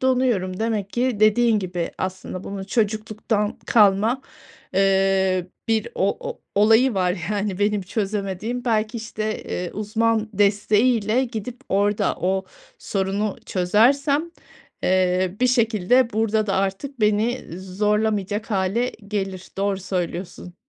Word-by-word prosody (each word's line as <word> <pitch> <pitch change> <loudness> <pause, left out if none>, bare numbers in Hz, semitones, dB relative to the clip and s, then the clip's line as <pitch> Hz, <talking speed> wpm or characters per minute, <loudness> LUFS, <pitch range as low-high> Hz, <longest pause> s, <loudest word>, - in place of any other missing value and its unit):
donuyorum. 245 -8 +1
Demek 215 -3 -1
ki 240 -2 -1
dediğin 220 +1 +4
gibi, 180 -3 -3
aslında 185 0 -5
bunu 195 -1 -6
çocukluktan 215 0 -1
kalma, 215 +4 +4 0.5
eee, 190 -1 +2 0.2
bir 225 -1 +1
o - - +1
o - - -6
olayı 225 +4 +5
var, 180 -3 0
yani, 205 -2 -1
benim 205 0 +1
çözemediğim. 205 +4 -3
Belki, 220 -1 0
işte, 220 -1 -4
eee, 180 -1 -4
uzman 220 +1 0
desteğiyle 215 +4 +2
gidip 235 +1 -6
orada 205 +1 +1
o 190 +1 0 0.3
sorunu 200 +1 -2
çözersem, 270 - +3 0.6
eee, 185 0 +2
bir 255 - +4
şekilde 235 0 +2
burada 220 0 +1
da 195 - 0
artık 195 +8 -2
beni 215 +4 +1
zorlamayacak 210 +2 -1
hâle 205 +5 0 0.2
gelir. 195 -3 -3
Doğru 195 0 0
söylüyorsun. 180 -1 -4
210 Hz, 115 wpm, -23 LUFS, 190-225 Hz, 0.6 s, olayı